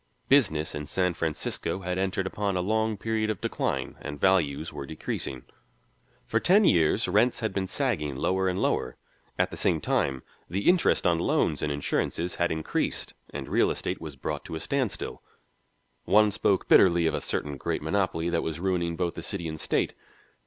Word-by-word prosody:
Business 90 - +3
in 75 0 -5
San 90 +2 +1
Francisco 80 +3 -2
had 90 0 -2
entered 95 0 -1
upon 100 0 -1
a - - +1
long 110 +2 0
period 110 +1 -1
of 105 -4 -2
decline, - - -2
and 75 -1 -6
values 80 -5 +2
were 70 -2 -6
decreasing; 65 -4 -4 0.8
for 115 - +1
ten 195 - +5
years 80 - +3
rents 125 +1 +3
had 110 -3 -1
been 95 -1 -1
sagging 100 - -1
lower 95 +7 +1
and 90 +1 0
lower. - - 0 0.4
At - - +1
the - - -6
same - - +2
time 65 -1 0 0.3
the 95 +4 -2
interest 180 -1 +4
on 85 -2 +3
loans - - +1
and 75 - -1
insurances 80 +4 -1
had 85 0 0
increased, 80 -1 -2 0.2
and - - -6
real - - +3
estate - - -3
was 75 -3 -7
brought 65 - -4
to - - -6
a - - -3
standstill; 130 - -2 0.8
one 105 +1 +5
spoke 95 -1 +1
bitterly 85 -3 +6
of 80 - +2
a - - -1
certain 75 -1 -2
great 70 - -3
monopoly 85 -1 0
that 85 - +1
was 80 -1 -4
ruining 85 -2 0
both 85 -1 -1
the - - -6
city 90 -5 -4
and 80 -1 -5
state. - - 0
90 Hz, 180 wpm, -27 LUFS, 80-100 Hz, 0.8 s, bitterly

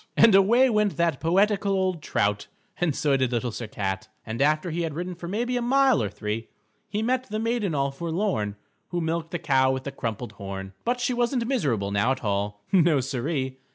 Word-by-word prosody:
_" - - -26
And 230 -2 +7
away 225 +7 +6
went 210 -4 +1
that 170 -5 +1
poetical 200 +4 +2
old 185 -3 0
trout, 105 -7 0 0.3
and 165 -5 0
so 145 -2 +2
did 130 -2 +1
Little 120 0 -1
Sir 115 +1 -6
Cat, 100 0 -3 0.2
and 110 +3 -4
after 155 +4 +2
he 170 +2 -2
had 160 -3 -3
ridden 180 +2 -3
for 170 0 -8
maybe 240 +7 -1
a - - -1
mile 265 +1 +4
or 105 - -1
three, 105 +2 -4 0.4
he 210 +2 -1
met 255 +1 0
the 215 - -2
Maiden 225 -6 0
All 140 0 +1
Forlorn 165 - -2 0.3
Who 175 - -2
Milked 165 0 -2
the 175 - -2
Cow 135 -5 +3
with 130 0 -3
the 140 - -4
Crumpled 115 -3 -4
Horn. 95 -1 -7
But 245 +1 0
she 245 +1 0
wasn't 240 0 0
miserable 135 - 0
now 100 +5 +2
at 135 - -9
all. 105 0 -2
No, 170 -6 +4
Siree. 130 +1 -2
160 Hz, 210 wpm, -26 LUFS, -, 0.4 s, And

